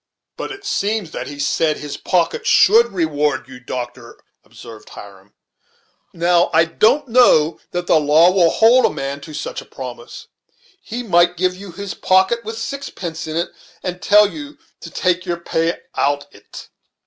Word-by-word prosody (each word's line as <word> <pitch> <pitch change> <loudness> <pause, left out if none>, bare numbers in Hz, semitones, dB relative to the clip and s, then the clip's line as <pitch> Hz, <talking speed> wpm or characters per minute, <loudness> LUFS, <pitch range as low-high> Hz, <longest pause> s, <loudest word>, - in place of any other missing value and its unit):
"But - - -6
it 395 0 -10
seems 210 - -2
that - - -6
he 145 - -8
said 155 +2 0
his 150 -1 -7
pocket 175 -3 -1
should 230 +4 +5
reward 150 -7 -1
you, 130 -1 -12
doctor," 120 -1 -7 0.2
observed 115 -2 -13
Hiram. 100 -1 -14 0.8
"Now 175 +1 +2
I 165 +1 +5
don't 220 - +2
know 225 -10 +4
that 175 0 -4
the 165 - +4
law 155 +4 +5
will 180 -3 +4
hold 235 +8 +4
a - - +3
man 140 +1 -5
to 155 0 -10
such - - -5
a - - -15
promise; - - -9 0.6
he 245 - -6
might 175 -4 +3
give 180 +1 0
you 195 0 -10
his 200 +2 -6
pocket 190 +5 +2
with 225 +1 -6
sixpence 225 - -6
in't, 165 +2 -3 0.3
and 180 -1 -5
tell 210 0 +5
you 295 +6 -9 0.2
to - - -10
take 180 0 -1
your 175 -1 -1
pay 165 0 -2
out 145 0 0
on't." 100 - -13
175 Hz, 165 wpm, -19 LUFS, 150-205 Hz, 0.8 s, should